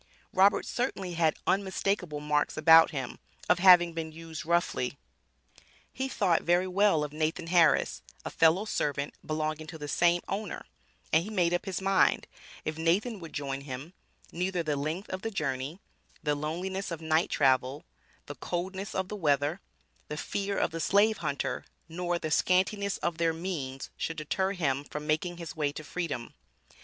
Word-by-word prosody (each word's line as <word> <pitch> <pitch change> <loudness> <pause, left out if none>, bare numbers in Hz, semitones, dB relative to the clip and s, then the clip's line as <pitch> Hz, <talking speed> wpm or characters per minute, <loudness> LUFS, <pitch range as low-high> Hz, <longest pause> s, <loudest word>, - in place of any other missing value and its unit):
Robert 195 +2 +4
certainly 195 -7 -2
had 160 -2 +2
unmistakable 190 -4 0
marks 150 0 0
about 160 +1 +8
him, 135 -6 -5 0.3
of - - +4
having 175 -2 +7
been 160 -1 -4
used 160 0 -8
roughly. 170 -6 0 1.0
He 265 - -2
thought 190 -9 +2
very 175 +2 +2
well 185 -4 +3
of 150 0 -5
Nathan 155 +2 -1
Harris, 170 -1 +3 0.2
a - - -4
fellow 165 +5 +4
servant 145 -8 -1
belonging 155 0 -2
to 160 - -8
the 150 -1 -6
same 175 +4 +2
owner, 205 +3 -4 0.5
and 160 +1 +5
he 205 - -7
made 180 -5 +1
up 175 - 0
his 190 -2 -3
mind, 195 0 +3 0.4
if 155 0 -3
Nathan 195 +7 +1
would 165 -2 -9
join 140 -1 -3
him, 140 +4 -7 0.4
neither 180 0 -1
the 150 -2 0
length 155 +8 -3
of 185 0 -4
the 225 - -2
journey, 145 -4 -3 0.5
the 150 -1 +1
loneliness 180 +6 -3
of 170 -2 -4
night 160 +1 +1
travel, 130 +2 +2 0.4
the - - -6
coldness 190 +3 -4
of 190 -1 -1
the 210 - -5
weather, 150 0 +1 0.5
the 150 - -5
fear 200 +4 -2
of - - +1
the 165 - -4
slave 210 +4 +4
hunter, 140 - -2 0.2
nor 175 +1 -2
the 155 -2 -4
scantiness 195 +4 +2
of 170 -1 -1
their 165 -1 +2
means 155 -6 -5
should 165 - -3
deter 190 +6 -1
him 140 -7 0
from 150 +1 -7
making 160 +3 0
his 165 -3 -7
way 150 -2 0
to 155 - -8
freedom. 145 -7 -4
165 Hz, 170 wpm, -29 LUFS, 150-185 Hz, 1.0 s, about